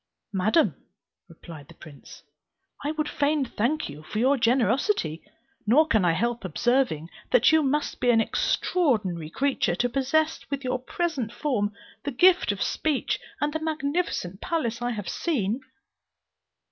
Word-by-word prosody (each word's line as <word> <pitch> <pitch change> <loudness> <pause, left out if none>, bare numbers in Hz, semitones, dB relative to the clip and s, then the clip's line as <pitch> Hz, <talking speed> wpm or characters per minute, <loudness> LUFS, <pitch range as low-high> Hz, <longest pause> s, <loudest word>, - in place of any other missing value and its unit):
"Madam," 215 - +3 0.6
replied 155 -5 -12
the - - -15
prince, 145 -3 -14 0.6
"I 290 - -1
would 305 0 -1
fain 290 -1 +1
thank 255 +7 -1
you 145 +1 -9
for 155 - -7
your 260 +5 +4
generosity, 235 - +1 0.5
nor 290 +9 +6
can 220 - +2
I 175 -2 +3
help 235 +5 -1
observing 185 - 0 0.2
that - - +5
you 315 0 +5
must 295 +1 -1
be 245 - +2
an 230 -2 +5
extraordinary 215 - 0
creature 265 - 0
to 245 +7 0
possess 290 +6 +1
with 280 -1 -3
your 255 0 -1
present 270 -4 -2
form 225 -7 -1 0.3
the 285 - -2
gift 350 - +4
of 200 - -2
speech 305 -4 -1 0.2
and 295 0 0
the 315 - -1
magnificent 305 - -2
palace 245 -10 -2
I 240 - -1
have 210 -6 -4
seen." 235 - -1
250 Hz, 145 wpm, -26 LUFS, 205-300 Hz, 0.6 s, nor